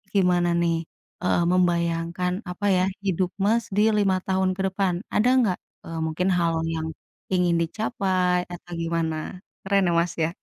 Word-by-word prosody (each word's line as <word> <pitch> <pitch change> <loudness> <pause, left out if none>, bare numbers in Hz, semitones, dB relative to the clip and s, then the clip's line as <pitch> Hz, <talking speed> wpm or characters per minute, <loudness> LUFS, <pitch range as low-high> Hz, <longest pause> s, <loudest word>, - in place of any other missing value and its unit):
gimana 180 -2 +3
nih, 170 -1 +2 0.5
eee, 180 - +2
membayangkan, 170 0 +1 0.2
apa 190 +3 -5
ya, 180 - +3 0.2
hidup 185 -1 +1 0.2
Mas 230 +2 +3
di 210 - +3 0.2
5 190 -1 +1
ke - - -2
depan. 190 -1 0 0.2
Ada 225 +4 +4
nggak, 200 -7 +2 0.3
eee, 165 -1 -5
mungkin 160 +4 -1
hal 170 -1 +2 0.2
yang 160 0 -3 0.5
ingin 180 -2 +3
dicapai 185 -1 0
atau 175 0 -11
gimana? 165 -1 -1 0.5
Keren 195 -2 +3
ya, - - +1
Mas, 170 0 0
ya? 160 - +2
180 Hz, 150 wpm, -25 LUFS, 170-190 Hz, 0.5 s, Ada